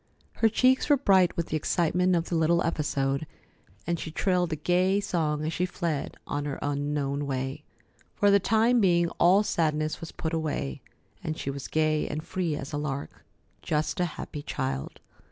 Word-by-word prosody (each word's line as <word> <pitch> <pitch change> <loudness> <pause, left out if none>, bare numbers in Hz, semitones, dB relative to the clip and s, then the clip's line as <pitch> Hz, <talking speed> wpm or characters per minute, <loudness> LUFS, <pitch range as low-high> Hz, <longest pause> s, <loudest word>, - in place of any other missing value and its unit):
Her 225 - +4
cheeks 255 +6 +3
were 290 - +6
bright 190 -8 +3
with 170 - -2
the - - -1
excitement 175 +4 +2
of 170 -1 0
the - - -4
little 165 +2 +3
episode, 145 -3 -1 0.6
and 170 0 -1
she - - -5
trilled 180 +1 0
a - - 0
gay 180 +5 +2
song 155 -6 -1
as 160 - -2
she 180 +2 0
fled 165 -5 -3
on 145 0 -3
her 145 -2 -3
unknown 145 0 -1
way. 135 +1 -3 0.5
For 205 0 +4
the 200 - +6
time 225 +4 +3
being, 175 -3 +3
all 185 +4 +5
sadness 155 -5 0
was 165 - -7
put 160 0 -4
away, 155 - -2 0.4
and 155 0 -3
she 140 - -3
was 140 -1 -6
gay 155 -1 +1
and 155 +1 -4
free 175 -3 -2
as 140 +1 -6
a - - -1
lark. 145 -1 -5 0.4
Just 155 +5 -1
a 180 - +3
happy 145 - -6
child. 130 - -4
160 Hz, 180 wpm, -27 LUFS, 145-180 Hz, 0.6 s, were